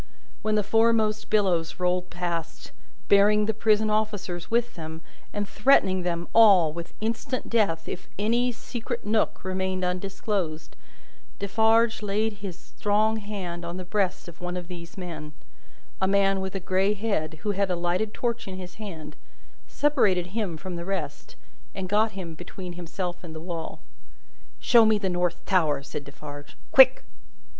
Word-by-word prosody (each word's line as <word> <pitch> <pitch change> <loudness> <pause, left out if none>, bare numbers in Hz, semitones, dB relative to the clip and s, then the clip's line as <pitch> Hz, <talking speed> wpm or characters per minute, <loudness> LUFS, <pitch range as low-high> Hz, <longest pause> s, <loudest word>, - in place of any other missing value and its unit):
When 215 0 +1
the 210 - +2
foremost 225 0 +2
billows 185 -7 +1
rolled 180 0 0
past, 170 -2 -4 0.4
bearing 210 +1 +5
the 220 - 0
prison 215 0 +2
officers 205 -5 -2
with 235 +1 +1
them, 160 -1 -7 0.3
and 205 -1 -3
threatening 195 -6 +3
them 175 -1 -2
all 195 -9 +7
with 170 0 -8
instant 230 +3 -3
death 200 -8 +1
if 180 - -6
any 235 +4 +2
secret 235 0 -6
nook 215 0 0
remained 185 0 -1
undisclosed, 185 -2 -3 0.6
Defarge 225 +3 +3
laid 210 +2 0
his 190 -4 -5
strong 215 +2 0
hand 195 -5 -5
on 170 +1 -5
the 185 - -6
breast 190 -2 -1
of 170 0 -12
one 180 0 -3
of 175 0 -7
these 170 0 -9
men 160 -5 -7 0.7
a 190 - +3
man 195 0 +3
with 190 0 -4
a - - 0
grey 190 +3 +1
head, 195 -7 -1
who 210 - +1
had 200 -1 0
a 180 - +1
lighted 175 +5 -1
torch 235 -1 -2
in 190 -1 -6
his 185 +3 -9
hand 160 -8 -7 0.5
separated 205 - +2
him 205 -7 -2
from 180 +1 -6
the 170 - -4
rest, 195 0 -4 0.4
and 190 -1 -3
got 215 +3 +2
him 180 -4 -6
between 175 +2 -8
himself 175 +1 -5
and 160 -2 -8
the - - -5
wall. 165 -1 -6 0.8
"Show 235 -2 +6
me 220 -1 +4
the 200 -2 -1
North 175 -1 -1
Tower!" 155 -7 +2
said 145 +1 -6
Defarge. 145 0 -10
"Quick!" 265 -1 +7
190 Hz, 160 wpm, -26 LUFS, 175-215 Hz, 0.8 s, all